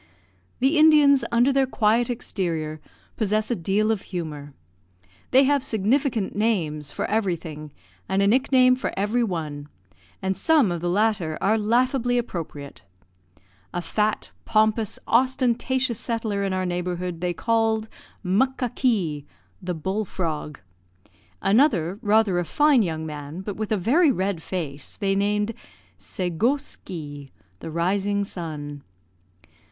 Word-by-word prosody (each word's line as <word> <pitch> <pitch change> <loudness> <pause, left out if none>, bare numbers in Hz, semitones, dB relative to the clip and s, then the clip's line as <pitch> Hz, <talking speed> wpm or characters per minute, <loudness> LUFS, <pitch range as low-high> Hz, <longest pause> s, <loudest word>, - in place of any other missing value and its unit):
The 275 +5 +2
Indians, 300 -3 +6
under 240 +4 +3
their 270 -1 +3
quiet 230 0 +2
exterior, 165 -10 -3 0.4
possess 215 +1 0
a - - +2
deal 200 +5 +1
of 215 -3 -1
humour. 150 -6 -6 0.7
They 265 +2 +6
have 280 0 +2
significant 225 0 0
names 160 -10 -1
for - - -3
everything, 170 -8 -2 0.4
and 190 - +1
a - - +4
nickname 255 +2 +4
for 255 - -3
every 210 +5 +1
one, 155 -8 -4 0.5
and 190 0 -1
some 285 - +3
of 170 -2 -3
the 175 - -1
latter 190 -5 +1
are 210 +3 +2
laughably 245 +3 +1
appropriate. 165 - -5 0.9
A - - 0
fat, 210 +4 -1
pompous, 220 -1 +1
ostentatious 255 0 +1
settler 225 -4 -2
in 195 - -1
our 185 0 -1
neighbourhood 180 -1 -3
they 180 -1 0
called 225 0 +1 0.4
Muckakee, 215 - 0 0.3
"the 180 -1 -3
bull 190 +7 -2
frog." 155 -6 -4 0.8
Another, 200 - +3
rather 210 -4 +3
a - - 0
fine 290 - +4
young 160 -5 -2
man, 150 +2 -7
but 200 0 -5
with 215 0 -4
a 215 - +3
very 280 - +3
red 190 -7 -1
face, 150 -6 -5
they 195 -1 0
named 205 +2 0 0.5
Segoskee, 170 - -3 0.3
"the - - -7
rising 195 +5 0
sun." 150 -6 -6
200 Hz, 125 wpm, -24 LUFS, 170-235 Hz, 0.9 s, Indians